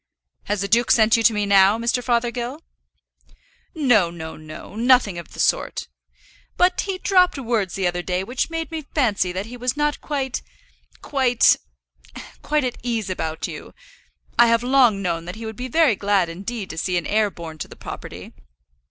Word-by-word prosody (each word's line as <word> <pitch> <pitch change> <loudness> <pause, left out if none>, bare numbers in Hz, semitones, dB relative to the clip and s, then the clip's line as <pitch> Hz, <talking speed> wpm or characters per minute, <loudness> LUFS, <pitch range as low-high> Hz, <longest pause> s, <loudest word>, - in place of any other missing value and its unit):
"Has 205 -2 -1
the 200 - -1
duke 235 +4 +2
sent 220 -1 +5
you 230 - +2
to 225 - +5
me 210 -1 -1
now, 200 +1 +5
Mr. 235 +2 -1
Fothergill?" 240 +4 -1 1.1
"No, 245 - +3
no, 160 -2 -8
no, 155 +5 -11
nothing 235 -6 +3
of 170 - -12
the - - -11
sort. - - 0 0.7
But 360 0 +3
he 390 -2 -3
dropped 365 -4 +3
words 230 -7 -1
the 195 - -1
other 175 0 0
day 180 +1 -2
which 245 +9 -2
made 330 0 -4
me 320 -1 -4
fancy 210 - +1
that 190 +3 -4
he 245 +2 -9
was 250 +3 -2
not 295 -1 0
quite, 270 -3 -3 0.6
quite, 255 -4 +3 0.9
quite 300 -1 0
at 250 -1 -3
ease 225 -5 -2
about 160 -3 -3
you. - - -9 0.6
I 240 - +8
have 230 +1 +2
long 245 -6 +3
known 170 -2 -2
that 180 - -6
he 225 +1 -8
would 220 0 -6
be 250 +3 -5
very 295 -3 +3
glad 200 -3 +1
indeed 195 +5 -6
to 160 - -5
see 180 0 0
an 175 - -2
heir 215 0 +2
born 165 -4 -9
to - - -5
the - - -13
property. - - -9
230 Hz, 185 wpm, -22 LUFS, 190-255 Hz, 1.1 s, I